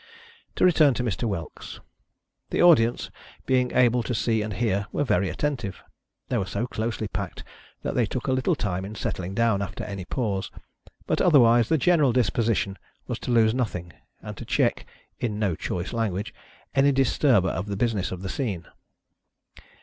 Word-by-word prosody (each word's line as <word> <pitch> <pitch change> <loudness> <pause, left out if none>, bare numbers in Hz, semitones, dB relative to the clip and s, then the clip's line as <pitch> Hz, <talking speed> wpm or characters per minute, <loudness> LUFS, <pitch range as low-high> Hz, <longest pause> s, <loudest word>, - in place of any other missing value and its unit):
To - - +3
return 155 -7 +5
to 125 - -1
Mr. 115 -2 -2
Whelks. 85 -6 -6 0.7
The - - -2
audience, 130 -10 +4 0.3
being 125 -1 +2
able 125 -1 +3
to 120 +1 -3
see 110 -1 +1
and 105 0 -3
hear, 100 -3 0
were - - 0
very 95 -8 +1
attentive. 135 -10 -3 0.4
They 120 - 0
were 95 - -2
so 100 +5 -2
closely 110 -2 -3
packed 100 -3 -5 0.4
that - - -2
they 120 -4 +1
took 125 +3 -4
a 135 - 0
little 130 +7 +1
time 95 -7 -2
in 105 +3 -7
settling 95 -2 -4
down 115 -2 +2
after 100 +3 -5
any 100 -3 -6
pause; 100 -4 -2 0.6
but - - 0
otherwise 120 -8 +5
the 160 - +3
general 150 -4 +3
disposition 110 -3 0 0.3
was - - -4
to - - -6
lose 110 -2 +4
nothing, 90 -9 -3 0.3
and - - -7
to - - -7
check - - 0 0.3
(in 105 -4 -2
no 105 -4 0
choice 90 +4 -4
language) 110 0 -2 0.4
any 140 +1 +4
dis 135 -2 +1
turber 115 -11 +4
of 95 +3 -3
the 100 -1 -3
business 110 -4 0
of 95 0 -6
the 95 - -4
scene. 100 - -3
115 Hz, 175 wpm, -25 LUFS, 100-125 Hz, 0.7 s, return